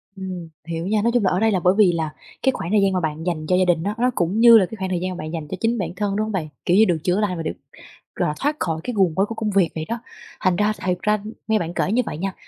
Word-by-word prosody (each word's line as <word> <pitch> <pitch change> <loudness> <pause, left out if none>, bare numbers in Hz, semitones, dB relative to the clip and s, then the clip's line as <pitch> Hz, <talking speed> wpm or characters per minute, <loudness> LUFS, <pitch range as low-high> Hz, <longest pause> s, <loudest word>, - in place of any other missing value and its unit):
Ừm, 185 -3 -6 0.2
hiểu 165 +2 -3
nha. 210 0 +1
Nói 235 +2 +2
chung 245 -4 +2
là 185 - +3
ở 180 - +1
đây 220 +1 +3
là, 190 - +1
bởi 180 +2 +3
vì 200 -5 +6
là 160 -2 -2 0.3
cái 265 - +4
khoảng 175 -8 -5
thời 210 -1 +4
gian 195 -1 +2
mà 185 - +1
bạn 155 -1 -3
dành 165 -4 -2
cho 180 - +3
gia 185 - +3
đình 170 -2 +2
á, 205 +2 -2
nó 250 +2 +2
cũng 180 +5 0
như 235 0 +9
là 200 - +4
cái 225 - -9
khoảng 190 -1 -3
thời 180 -2 -1
gian 185 0 -3
bạn 155 +1 -6
dành 160 -3 -4
cho 185 - -5
chính 230 +3 +1
bản 175 -5 -2
thân, 200 +1 -1
đúng 215 +1 0
hông 220 - -4
bạn? 175 -6 -2 0.2
Kiểu 180 - +3
như 220 - +7
được 175 -4 +1
chữa 180 +2 +1
lành 200 -5 0
và 165 - -4
được, - - -2 0.6
gọi - - 0
là, - - -2
thoát 295 +2 0
khỏi 160 -2 -2
cái 245 - -3
guồng 185 -6 +2
quay 195 - +3
của 225 +2 -7
công 215 -1 -2
việc 190 -4 +3
vậy 155 -1 -3
đó. 230 +1 -3 0.4
Thành 185 -3 +2
ra, 210 +2 +2
thiệt 180 -1 +1
ra, 210 - +2
ưm, 215 +1 -7
nghe 220 -1 +2
bạn 170 0 -4
kể 190 - 0
như 250 +3 +3
vậy 150 - -5
nha, 195 +2 -3
185 Hz, 335 wpm, -22 LUFS, 170-215 Hz, 0.6 s, như